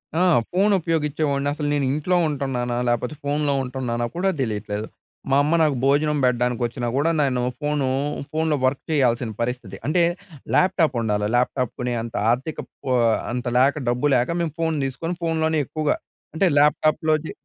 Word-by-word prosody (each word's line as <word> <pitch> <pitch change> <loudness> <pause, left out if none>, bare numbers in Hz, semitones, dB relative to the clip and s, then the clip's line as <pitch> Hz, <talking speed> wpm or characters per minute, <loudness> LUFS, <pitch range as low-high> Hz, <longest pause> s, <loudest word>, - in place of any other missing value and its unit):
ఆ! - - +1 0.3
ఫోన్ 195 +4 +3
ఉపయోగించేవాడిని. 150 -3 0
అసలు 150 -1 -3
"నేను 140 -2 +1
ఇంట్లో 175 +5 +1
ఉంటున్నానా? 130 -4 -2
లేకపోతే 120 +5 0
ఫోన్‌లో 145 0 0
ఉంటున్నానా?" 125 -2 -2
కూడా 190 +2 +1
తెలియట్లేదు. 105 -2 -3 0.4
మా 135 - +5
అమ్మ 155 +3 +2
నాకు 150 -3 +3
భోజనం 150 +2 +2
పెట్టడానికొచ్చినా 120 -1 0
కూడా 155 +4 +2
నేను 130 -3 +1 0.2
ఫోను 145 -3 0 0.4
ఫోన్‌లో 160 -1 +1
వర్క్ 130 +1 0
చేయాల్సిన 120 -5 +1
పరిస్థితి. 125 +1 -3
అంటే 170 +3 +3 0.5
ల్యాప్‌టా‌ప్ 185 -7 +3
ఉండాలి. 105 -2 0
ల్యాప్‌టా‌ప్ 125 0 0
కొనే 125 0 -1
అంత 115 - -8 0.2
ఆర్థికప్ 135 +6 -3 0.2
ఆహ్, 115 -2 +3
అంత 125 0 -3
లేక, 135 +3 +4
డబ్బు 125 +4 +1
లేక 125 +3 +1
మేము 160 -4 -2
ఫోన్ 160 -2 0
తీసుకొని 165 +7 -3
ఫోన్‍లోనే 160 -1 +1
ఎక్కువగా. 155 -2 -1 0.4
అంటే 190 - +2
ల్యాప్‌టా‌ప్‍లోది 155 +1 +2
140 Hz, 150 wpm, -23 LUFS, 125-155 Hz, 0.5 s, మా